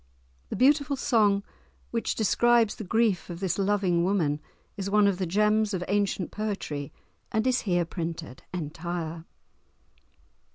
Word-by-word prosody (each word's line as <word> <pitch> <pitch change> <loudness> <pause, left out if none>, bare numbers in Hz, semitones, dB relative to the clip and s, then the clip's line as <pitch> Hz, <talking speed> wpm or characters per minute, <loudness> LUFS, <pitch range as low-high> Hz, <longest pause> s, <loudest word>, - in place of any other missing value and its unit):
The - - -3
beautiful 280 +4 +3
song 210 -6 +2 0.5
which 230 -1 -1
describes 230 +1 +3
the - - -7
grief 215 -2 +1
of 170 -1 -6
this 190 -1 -1
loving 195 -4 +2
woman 170 -6 +1 0.4
is 195 0 -4
one 210 0 +4
of 195 -2 +2
the 185 - -1
gems 210 +2 +2
of 180 - -2
ancient 200 -2 0
poetry, 195 -10 -4 0.4
and 220 +2 0
is 255 -1 +2
here 175 -1 +2
printed 165 -5 -5
entire. 165 0 -4
200 Hz, 135 wpm, -27 LUFS, 175-215 Hz, 0.5 s, one